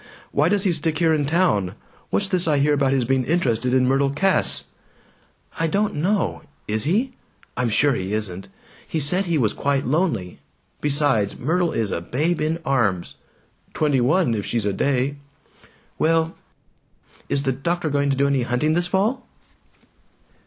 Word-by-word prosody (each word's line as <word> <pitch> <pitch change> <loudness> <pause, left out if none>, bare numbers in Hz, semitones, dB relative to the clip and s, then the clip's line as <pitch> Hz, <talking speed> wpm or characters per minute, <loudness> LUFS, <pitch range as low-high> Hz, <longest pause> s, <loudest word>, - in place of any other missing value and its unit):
Why 150 +4 +2
does 200 0 +1
he 190 - +2
stick 160 -1 -1
here 165 -1 +3
in 145 -2 0
town? 125 - +1 0.3
What's 200 - 0
this 185 -3 +1
I 150 -2 +2
hear 145 +1 +3
about 140 -2 +2
his 135 -3 +1
being 130 +1 +1
interested 125 -6 0
in 130 0 +3
Myrtle 135 +1 +2
Cass?" 185 +8 +2 1.0
"I 165 - +1
don't 200 +5 0
know. 190 +7 -1 0.3
Is 110 0 -1
he? 225 - 0 0.4
I'm 125 -2 0
sure 140 +6 +3
he 95 -4 -3
isn't! 100 -3 -3 0.4
He 160 - -2
said 180 +7 +2
he 170 -2 +1
was 110 -7 +1
quite 140 -1 -1
lonely! 135 - -1 0.4
Besides, 145 -8 +1
Myrtle 170 +5 0
is 110 -4 -2
a - - -2
babe 155 - -1
in 155 +2 0
arms!" 110 -10 0 0.6
"Twenty 145 -4 +2
one 155 +1 +2
if 105 -2 -2
she's 115 -1 -2
a 100 - 0
day!" 140 +5 0 0.8
"Well 165 0 +1 0.9
Is 140 - 0
the 135 - +1
doctor 160 +4 -2
going 140 0 +1
to 135 - +1
do 140 - +2
any 140 -2 +1
hunting 125 +6 0
this 175 +1 +1
fall?" 210 +8 0
145 Hz, 165 wpm, -22 LUFS, 125-170 Hz, 1.0 s, here